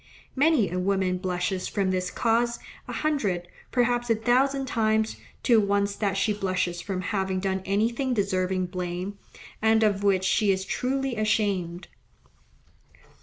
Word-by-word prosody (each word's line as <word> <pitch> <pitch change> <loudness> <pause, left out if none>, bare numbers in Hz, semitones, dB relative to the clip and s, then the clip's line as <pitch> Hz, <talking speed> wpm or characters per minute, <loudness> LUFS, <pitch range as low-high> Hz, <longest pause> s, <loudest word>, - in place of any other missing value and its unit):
Many 280 - +3
a 180 - -1
woman 185 -1 0
blushes 180 0 -2
from 195 -2 0
this 185 -1 -1
cause, 235 +1 +1 0.3
a - - -5
hundred, 205 - -1 0.2
perhaps 240 -1 +1
a 230 - +4
thousand 265 +4 +2
times, 220 -3 +1 0.3
to 235 -3 +5
once 200 0 +1
that 200 -2 -1
she 210 +2 +2
blushes 185 -3 -1
from 185 +1 -3
having 190 -1 -1
done 190 0 -1
anything 235 +6 0
deserving 185 -2 0
blame, 180 +2 -4 0.4
and 220 0 +4
of 200 -2 +2
which 195 -2 +3
she 205 +1 +3
is 190 0 -1
truly 265 +3 -1
ashamed. 200 -5 0
200 Hz, 140 wpm, -26 LUFS, 185-230 Hz, 0.4 s, to